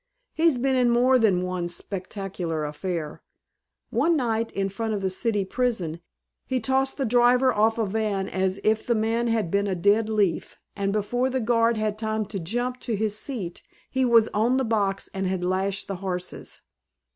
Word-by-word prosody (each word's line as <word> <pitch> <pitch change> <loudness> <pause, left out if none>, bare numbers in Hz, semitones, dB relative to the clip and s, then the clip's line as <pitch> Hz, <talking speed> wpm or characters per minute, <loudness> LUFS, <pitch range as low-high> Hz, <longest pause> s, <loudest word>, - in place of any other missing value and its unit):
He's 320 -4 +3
been 265 +2 +1
in 250 -1 +3
more 250 +2 +4
than 195 -6 +3
one 180 -1 -2
spectacular 180 -3 -4
affair. 155 +1 -4 0.7
One 335 -1 +2
night, 230 -3 -1
in 195 0 0
front 220 +3 -3
of 200 - -3
the 190 - 0
City 205 0 0
Prison, 190 -8 -2 0.5
he 260 -1 0
tossed 265 +3 0
the 270 - 0
driver 245 +2 +4
off 220 +2 +2
a 225 - +1
van 200 -1 -1
as 190 +1 -1
if 220 0 +2
the 235 - +2
man 225 +2 0
had 220 -7 0
been 200 0 +1
a 190 - -1
dead 205 +5 +2
leaf, 205 -6 0 0.2
and 200 -1 -1
before 245 +5 0
the 260 0 -1
guard 230 -1 +2
had 215 -1 -1
time 220 -1 -1
to 195 0 -5
jump 245 +8 -2
to 230 - -2
his 210 0 -1
seat 215 -7 -4 0.3
he 260 0 +1
was 230 -3 +5
on 230 +5 +2
the 265 - +1
box 200 -3 0
and 190 -1 -2
had 185 -1 -1
lashed 190 +2 -1
the 195 - -4
horses. 180 -1 -5
215 Hz, 185 wpm, -25 LUFS, 190-240 Hz, 0.7 s, was